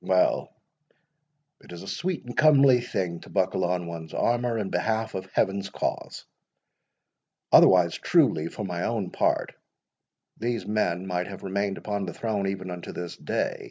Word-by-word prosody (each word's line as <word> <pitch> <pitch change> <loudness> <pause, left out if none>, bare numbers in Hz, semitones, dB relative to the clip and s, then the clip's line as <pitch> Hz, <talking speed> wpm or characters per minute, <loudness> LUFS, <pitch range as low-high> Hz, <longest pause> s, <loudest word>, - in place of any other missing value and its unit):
Well, 95 -1 +2 1.1
it - - -16
is 85 +1 -8
a - - -10
sweet 180 - -3
and 120 - -8
comely 140 -5 +6
thing 90 -7 -3
to - - -14
buckle - - 0
on 90 0 0
one's 85 -1 -7
armour 120 -1 +1
in 105 -3 -3
behalf 110 0 -1
of 95 0 -5
Heaven's 100 0 0
cause; - - -4 1.3
otherwise 90 -2 +6
truly, 120 - +3
for 105 - -6
mine 90 -2 -3
own 105 -6 -2
part, - - +1 0.9
these 115 -3 -2
men 95 -4 0
might 90 -1 -2
have 100 -2 -9
remained 100 +1 -1
upon 100 -2 -3
the 85 - -6
throne 105 -4 -1
even 95 -1 -4
unto 90 -1 -7
this 90 -1 -6
day. - - -2
95 Hz, 160 wpm, -26 LUFS, 90-115 Hz, 1.3 s, comely